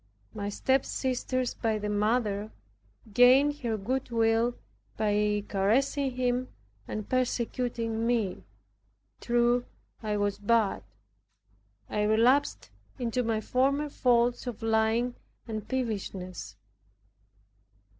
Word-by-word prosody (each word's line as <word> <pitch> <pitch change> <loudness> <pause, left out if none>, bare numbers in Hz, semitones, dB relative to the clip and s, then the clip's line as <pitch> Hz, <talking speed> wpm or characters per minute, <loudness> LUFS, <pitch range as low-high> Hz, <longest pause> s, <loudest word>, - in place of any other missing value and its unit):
My 205 -1 -3
stepsisters 255 +1 0
by 220 -1 -1
the 210 0 -4
mother, 210 0 0 0.6
gained 265 +5 +6
her 230 -5 -1
goodwill 230 +1 +1 0.4
by 210 -1 +1
caressing 260 +8 +1
him 250 0 0 0.4
and 215 -1 -5
persecuting 235 -2 -1
me. 225 -6 0 0.8
True, 240 0 +2 0.4
I 210 -2 -1
was 205 0 -1
bad. 215 0 +2 1.1
I 210 - -1
relapsed 230 +6 +2 0.3
into 245 -1 -1
my 225 -2 0
former 275 +5 +1
faults 245 -2 +2
of 235 -2 -5
lying 225 +2 +2 0.3
and 215 -2 -5
peevishness. 200 -7 -4
230 Hz, 95 wpm, -29 LUFS, 215-250 Hz, 1.1 s, gained